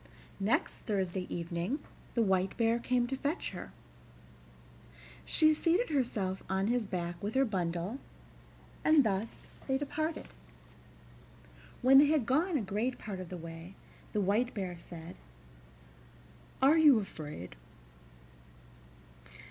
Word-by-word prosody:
Next 205 Hz, +5 st, +1 dB
Thursday 190 Hz, -3 st, -2 dB
evening 170 Hz, -, -2 dB, 0.4 s
the 235 Hz, -, +3 dB
White 190 Hz, -1 st, +1 dB
Bear 230 Hz, 0 st, +2 dB
came 245 Hz, 0 st, +1 dB
to 265 Hz, +2 st, -2 dB
fetch 290 Hz, +6 st, -2 dB
her. -, -, -8 dB, 1.5 s
She 310 Hz, -1 st, +4 dB
seated 340 Hz, +7 st, +1 dB
herself 205 Hz, -9 st, -1 dB
on 190 Hz, +1 st, +1 dB
his 240 Hz, -3 st, +1 dB
back 175 Hz, -2 st, -4 dB
with 210 Hz, +3 st, -3 dB
her 270 Hz, +1 st, +4 dB
bundle, 180 Hz, +2 st, -2 dB, 0.8 s
and 310 Hz, -2 st, +6 dB
thus 210 Hz, 0 st, -2 dB, 0.3 s
they 265 Hz, -, +2 dB
departed. 310 Hz, +3 st, -3 dB, 1.6 s
When 270 Hz, +2 st, +8 dB
they 290 Hz, -, +7 dB
had 300 Hz, -5 st, +2 dB
gone 310 Hz, -, +2 dB
a -, -, -1 dB
great 215 Hz, +6 st, -2 dB
part 200 Hz, -3 st, -6 dB
of 185 Hz, -2 st, -7 dB
the 180 Hz, -, -6 dB
way, 165 Hz, +2 st, -9 dB, 0.4 s
the 210 Hz, -, 0 dB
White 210 Hz, +6 st, +1 dB
Bear 185 Hz, -4 st, -3 dB
said: 170 Hz, 0 st, -10 dB, 1.5 s
"Are 300 Hz, +4 st, +6 dB
you 295 Hz, -6 st, +7 dB
afraid?" 150 Hz, -, -7 dB
215 Hz, 125 wpm, -32 LUFS, 185-270 Hz, 1.6 s, When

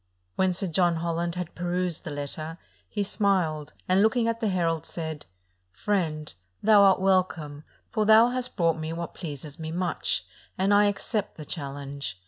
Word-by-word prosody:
When 190 Hz, -1 st, +2 dB
Sir 185 Hz, +3 st, -1 dB
John 175 Hz, 0 st, +2 dB
Holland 170 Hz, +1 st, -2 dB
had 180 Hz, -2 st, -4 dB
perused 175 Hz, 0 st, -2 dB
the -, -, -4 dB
letter, 155 Hz, +3 st, -5 dB, 0.3 s
he 205 Hz, -, -1 dB
smiled, 185 Hz, -8 st, 0 dB
and, 185 Hz, +2 st, +4 dB
looking 225 Hz, +2 st, +3 dB
at 230 Hz, 0 st, 0 dB
the 225 Hz, -, 0 dB
herald, 165 Hz, -4 st, 0 dB
said, 160 Hz, -, -5 dB, 0.4 s
"Friend, 155 Hz, -, -1 dB, 0.3 s
thou 210 Hz, -1 st, +7 dB
art 195 Hz, -1 st, +6 dB
welcome; 180 Hz, -6 st, 0 dB, 0.3 s
for 215 Hz, -2 st, +1 dB
thou 220 Hz, +2 st, +7 dB
hast 250 Hz, 0 st, -3 dB
brought 165 Hz, -3 st, +2 dB
me 155 Hz, 0 st, -3 dB
what 170 Hz, 0 st, -5 dB
pleases 150 Hz, -3 st, -7 dB
me 160 Hz, 0 st, -4 dB
much, 175 Hz, -, -1 dB, 0.3 s
and 195 Hz, +2 st, +3 dB
I 205 Hz, 0 st, +6 dB
accept 205 Hz, +1 st, -1 dB
the 155 Hz, -, -7 dB
challenge. 140 Hz, -, -5 dB
175 Hz, 165 wpm, -27 LUFS, 155-200 Hz, 0.4 s, thou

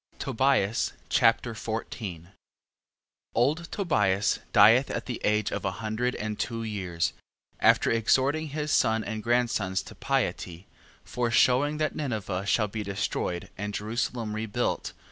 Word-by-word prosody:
Tobias 115 Hz, -4 st, +1 dB, 0.2 s
Chapter 115 Hz, +1 st, +3 dB
14 110 Hz, -6 st, -5 dB, 1.1 s
Old 150 Hz, +8 st, +1 dB
Tobias 105 Hz, -, +1 dB
dieth 115 Hz, +6 st, +6 dB
at -, -, -3 dB
the 125 Hz, -, -5 dB
age 105 Hz, 0 st, +1 dB
of -, -, -3 dB
a 95 Hz, -, -1 dB
hundred 115 Hz, +3 st, -2 dB
and 105 Hz, 0 st, -4 dB
two 115 Hz, -2 st, -2 dB
years, 95 Hz, -6 st, -2 dB, 0.5 s
after -, -, +4 dB
exhorting 135 Hz, +7 st, +2 dB
his 150 Hz, +1 st, -3 dB
son 110 Hz, -4 st, +3 dB
and 110 Hz, +1 st, -4 dB
grandsons 115 Hz, -5 st, 0 dB
to -, -, -11 dB
piety, 85 Hz, +2 st, -2 dB, 0.4 s
foreshewing 125 Hz, +4 st, +2 dB
that 155 Hz, 0 st, 0 dB
Ninive 105 Hz, -9 st, -3 dB
shall 105 Hz, +1 st, +2 dB
be 105 Hz, +2 st, -5 dB
destroyed, 100 Hz, -3 st, -3 dB
and 105 Hz, 0 st, -3 dB
Jerusalem 110 Hz, +1 st, -2 dB
rebuilt. 110 Hz, -1 st, -2 dB
110 Hz, 125 wpm, -27 LUFS, 100-125 Hz, 1.1 s, dieth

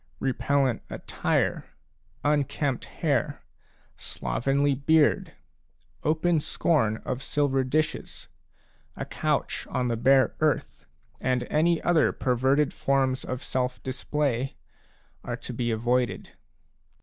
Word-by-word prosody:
Re 135 Hz, -1 st, 0 dB
pellent 135 Hz, -2 st, +1 dB
attire, -, -, -1 dB, 0.6 s
unkempt 145 Hz, -2 st, 0 dB
hair, -, -, -1 dB, 0.5 s
slovenly 135 Hz, -, 0 dB
beard, 145 Hz, +3 st, +2 dB, 0.7 s
open 160 Hz, +2 st, +2 dB
scorn 140 Hz, -8 st, +1 dB
of 130 Hz, 0 st, -3 dB
silver 140 Hz, -2 st, +1 dB
dishes, 155 Hz, +4 st, -2 dB, 0.7 s
a -, -, -4 dB
couch -, -, -1 dB
on 125 Hz, -1 st, 0 dB
the 115 Hz, -, +1 dB
bare 130 Hz, +3 st, +4 dB
earth, 155 Hz, -5 st, -1 dB, 0.3 s
and 125 Hz, -1 st, 0 dB
any 165 Hz, +2 st, +3 dB
other 165 Hz, -4 st, +4 dB
perverted 130 Hz, +4 st, +1 dB
forms 135 Hz, -1 st, +1 dB
of 130 Hz, +2 st, -5 dB
self 125 Hz, -1 st, -2 dB
display, 135 Hz, -1 st, -1 dB, 0.7 s
are -, -, -4 dB
to 125 Hz, -, -7 dB
be 120 Hz, 0 st, -1 dB
avoided. 120 Hz, +2 st, 0 dB
135 Hz, 105 wpm, -27 LUFS, 125-150 Hz, 0.7 s, bare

